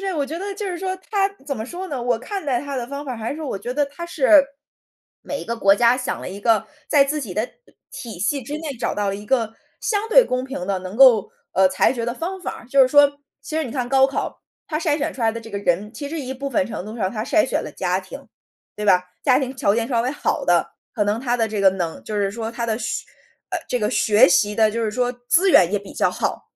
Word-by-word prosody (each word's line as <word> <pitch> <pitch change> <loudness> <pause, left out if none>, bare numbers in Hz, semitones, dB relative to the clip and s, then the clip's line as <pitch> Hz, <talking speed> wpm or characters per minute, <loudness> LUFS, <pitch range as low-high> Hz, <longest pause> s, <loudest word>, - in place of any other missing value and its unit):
是 390 -1 -2
我 290 -3 -1
觉 310 +4 -5
得 400 +2 -4
就 415 +1 -4
是 365 -2 -3
说 375 +1 -3
它， 395 -2 +2 0.2
怎 275 -3 -3
么 220 - -4
说 355 +9 -6
呢， 270 -6 -4
我 240 -1 +1
看 385 - -5
待 255 -4 0
它 280 0 -5
的 245 -2 -3
方 280 +1 -5
法 260 - -4
儿 - - -6
还 225 +4 -4
是 315 - -8
我 270 -9 -3
觉 245 - -4
得 290 +2 +1
它 290 +5 -8
是 305 -3 +5 0.8
每 285 - -4
一 - - -8
个 235 +1 -3
国 195 -2 +5
家 235 +2 +4
想 250 - -3
了 - - -6
一 195 +2 -8
个， 220 -1 +2 0.2
在 285 -3 +5
自 300 +2 -2
己 220 -9 -5
的 215 +6 -1 0.4
体 225 -7 -8
系 265 +9 0
之 285 +5 -6
内 305 -4 -5
找 - - -2
到 205 -1 -1
了 195 - -1
一 205 +1 -8
个 225 -2 0 0.3
相 425 0 -1
对 - - +7
公 255 0 -2
平 260 -9 -5
地 195 -1 0
能 185 +3 -7
够， 250 -6 +6 0.2
呃， 190 0 +4
裁 225 - +2
决 235 -3 -3
的 235 - -1
方 370 +6 -4
法 - - -5
儿。 - - -14
就 275 +1 +4
是 255 - +4
说 285 +1 +5 0.2
其 305 +3 -5
实 320 - +1
你 250 - -6
看 250 -1 -2
高 265 0 +5
考， 275 - -4 0.2
它 305 - -2
筛 310 -2 0
选 290 - -2
出 - - -10
来 225 -1 +3
的 230 - -6
这 225 0 -11
个 200 - -3
人， 200 +2 0
其 280 +5 -6
实 320 +2 -4
一 265 -2 -5
部 275 +1 -5
分 280 -1 +1
程 225 - -6
度 215 +3 -8
上 190 -5 -1
它 215 0 -3
筛 320 +4 +3
选 - - -1
了 - - -7
家 - - -1
庭， - - -11 0.5
对 210 - -5
吧？ 180 -3 +4 0.2
家 260 -3 +4
庭 265 -1 -3
条 255 -7 +2
件 225 +1 0
稍 235 -3 +1
微 250 - -1
好 290 - -1
的， - - +2 0.2
可 210 - +1
能 205 +2 0
他 245 -1 0
的 225 -2 +1
这 215 -2 -3
个 195 -1 +6
能 175 -4 -4
就 215 - -5
是 200 -1 +1
说 225 +1 -4
他 235 0 -4
的 220 -1 0
学 220 -1 -3 0.5
呃， - - -1
这 250 - 0
个 210 -2 0
学 210 -2 +5
习 205 +4 +2
的 220 -1 +5
就 230 +2 -2
是 215 - 0
说 245 +2 0 0.2
资 380 +3 +4
源 180 - +6
也 205 - +2
比 200 0 -12
较 - - +2
好。 - - 0
啊， - - -8
245 Hz, 305 characters per minute, -22 LUFS, 215-285 Hz, 0.8 s, 对